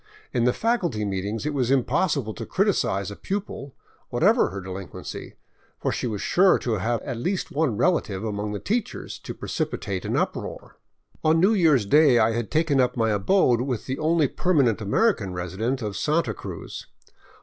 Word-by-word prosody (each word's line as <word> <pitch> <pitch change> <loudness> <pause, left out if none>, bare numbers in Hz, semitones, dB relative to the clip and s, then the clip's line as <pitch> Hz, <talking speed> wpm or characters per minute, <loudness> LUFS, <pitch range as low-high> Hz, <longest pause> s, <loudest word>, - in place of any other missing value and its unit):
In 120 -1 +2
the 125 - +4
faculty 175 - 0
meetings 100 +5 -3
it 150 - -1
was 130 -4 0
impossible 135 - +1
to 115 - -6
criticize 105 - 0
a - - -7
pupil, 190 - -5 0.3
whatever - - +3
her 100 - -6
delinquency, 95 -1 -7 0.4
for - - -1
she - - -2
was 105 -4 -3
sure 190 +1 +4
to 115 -4 -2
have 115 0 -1
at 130 -4 -4
least 185 +9 -2
one 140 -7 0
relative 115 - +1
among 105 -1 -3
the 105 - -3
teachers 225 +1 -3
to - - -7
precipitate - - -3
an - - -1
uproar. - - -3 0.5
On 160 +1 +4
New 195 +6 +4
Year's 155 - +4
Day 145 +3 +5
I 110 0 +4
had 115 -2 -2
taken 155 -4 +2
up 125 0 0
my 110 -1 +2
abode 120 - +3
with 125 -3 -3
the 130 +1 -3
only 155 -1 +3
perma 175 0 +2
nent 110 - -7
American 105 - +1
resident 105 +9 -2
of 105 -2 -3
Santa 150 -7 0
Cruz. - - -8
125 Hz, 175 wpm, -25 LUFS, 105-160 Hz, 0.5 s, Day